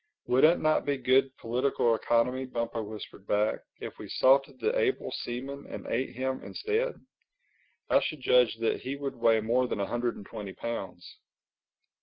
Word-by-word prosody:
"Would 125 +1 +3
it 170 +3 +5
not 155 0 +2
be 145 -1 0
good 130 +1 +3
political 120 0 +1
economy," 120 +3 +1
Bumpo 115 -2 -3
whispered 105 -2 -9
back, 105 +1 +1 0.2
"if - - -8
we - - -8
salted 135 - +3
the 450 +3 0
able 450 -5 0
seaman 135 +4 -5
and - - -7
ate 130 +1 -2
him 130 +1 -2
instead? 445 +4 -1 0.9
I - - +5
should 155 - -3
judge 125 -2 +4
that 115 - 0
he 135 +2 -4
would 140 -1 -4
weigh 115 -2 +3
more 120 +3 +2
than 105 - -3
a 100 - 0
hundred 120 +3 -1
and 100 - -10
twenty 100 -2 -7
pounds." 100 -6 -6
125 Hz, 170 wpm, -29 LUFS, 115-140 Hz, 0.9 s, it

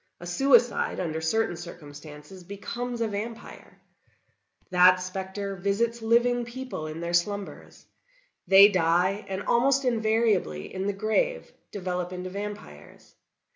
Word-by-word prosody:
A 175 - -9
suicide, 245 +6 +2
under 160 -3 -3
certain 175 +3 0
circumstances, 155 0 -11
becomes 235 +6 -5
a 230 - +1
vampire. 220 +2 -7 0.9
That 180 0 +7
specter 190 +2 -5
visits 215 +5 -1
living 240 +2 +2
people 235 -8 -6
in 155 +2 -7
their 170 0 -4
slumbers; 200 +3 -3 0.6
they 195 +1 +9
die, 185 +1 +1
and 190 +1 -4
almost 270 +3 +2
invariably, 220 - 0
in 190 +1 -3
the 205 - 0
grave, 220 - -1 0.2
develop 180 -2 -4
into 185 0 -6
vampires. 200 - -9
195 Hz, 120 wpm, -26 LUFS, 175-230 Hz, 0.9 s, they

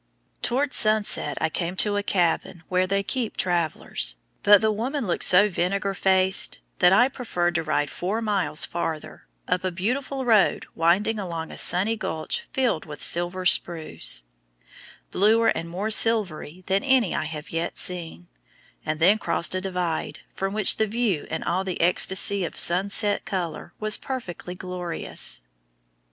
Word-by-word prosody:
Towards 270 +3 0
sunset 215 -8 +3
I 160 - 0
came 170 +2 -3
to 205 +1 +2
a 205 - +1
cabin 175 -2 -1
where 185 0 +1
they 195 +1 0
"keep 240 +1 -3
travelers," 170 - -1 0.3
but 205 0 +7
the 220 +1 +1
woman 245 +5 -3
looked 175 - -1
so 190 +3 +6
vinegar 195 +1 -1
faced 190 0 +1 0.2
that 180 0 +5
I 245 +6 +5
preferred 180 -10 -2
to 165 -1 -1
ride 145 -2 -1
four 195 +5 -3
miles 195 -9 -1
farther, 165 - -5 0.2
up 180 - 0
a 185 - 0
beautiful 255 +9 -3
road 220 -4 +3
winding 195 +7 +1
along 170 -4 -5
a - - -8
sunny 195 +6 +3
gulch 215 - -4
filled 255 - 0
with 150 -1 -9
silver 175 +2 0
spruce, 160 - +1 0.9
bluer 220 +4 +3
and 165 +1 -2
more 195 +6 -3
silvery 185 -7 0
than 195 +1 0
any 260 -8 +2
I - - -2
have 155 -1 -7
yet 165 +1 -3
seen, 165 - -1 0.6
and 155 0 -3
then 195 +6 +4
crossed 170 -4 -1
a 185 - -2
divide, 180 -4 -3
from 195 0 -3
which 215 -2 +5
the 220 - +1
view 215 -7 -1
in 160 - -4
all 180 +2 -1
the 185 -2 -4
ecstasy 190 +3 +2
of 170 - -5
sunset 200 +4 +3
color 175 -3 -5
was 215 0 +1
perfectly 190 -9 -6
glorious. 180 - -3
185 Hz, 155 wpm, -24 LUFS, 170-215 Hz, 0.9 s, but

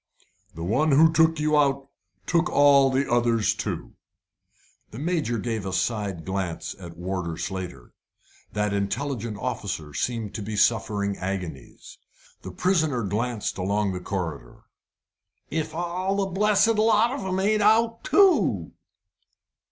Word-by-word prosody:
"The 80 - -6
one 140 - +2
who 160 +3 +6
took 160 0 +3
you 150 0 +2
out 140 -2 +2 0.4
took 170 +1 +1
all 140 -1 +5
the 135 +1 0
others 120 -3 +2
too." - - -5 1.0
The 110 - -10
Major 150 -5 -1
gave 110 -1 -3
a 95 - -4
side 100 -4 -2
glance 95 -3 -3
at 85 -2 -10
Warder 90 -2 -4
Slater. 85 -7 -6 0.6
That 105 -1 0
intelligent 110 +2 -2
officer 75 -6 -4
seemed 110 - -3
to 105 - -5
be 105 +1 -5
suffering 105 -2 +1
agonies. 90 -8 -6 0.4
The - - -8
prisoner 155 - +1
glanced 105 +2 -2
along 100 +2 0
the 90 - -4
corridor. 85 -9 -5 0.9
"If 155 0 -3
all 180 +3 -2
the 200 -1 +1
blessed 210 +3 +2
lot 220 +2 +4
of 270 -6 -4
'em 190 0 -1
ain't 210 +2 +2
out 225 +2 +3
too!" 390 -2 +3
120 Hz, 135 wpm, -25 LUFS, 95-165 Hz, 1.0 s, who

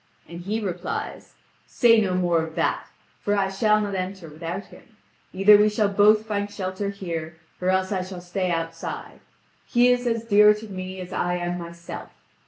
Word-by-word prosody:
And 170 0 -9
he 210 +5 -2
replies: 180 -4 -5 0.3
"Say 230 -2 +4
no 185 -3 0
more 175 -2 +2
of 160 0 -6
that! - - 0 0.3
For 205 - 0
I 195 -1 +1
shall 215 +2 +3
not 205 -1 -2
enter 185 -2 -4
without 170 +5 -6
him. 220 -2 -18 0.3
Either 200 +2 +7
we 210 +1 +4
shall 210 -1 +1
both 210 +2 +4
find 205 -2 -2
shelter 195 0 -4
here 170 -5 -5 0.2
or 180 - +1
else 190 +1 +1
I 190 -2 0
shall 185 0 -7
stay 180 +1 -2
outside; 165 -1 -4 0.5
he 245 +1 +4
is 245 0 +2
as 230 -1 -1
dear 210 -1 +6
to 215 +1 -9
me 185 -1 -6
as 180 +1 -8
I 175 0 0
am 175 0 -3
myself. 170 0 -8
190 Hz, 185 wpm, -24 LUFS, 175-210 Hz, 0.5 s, Either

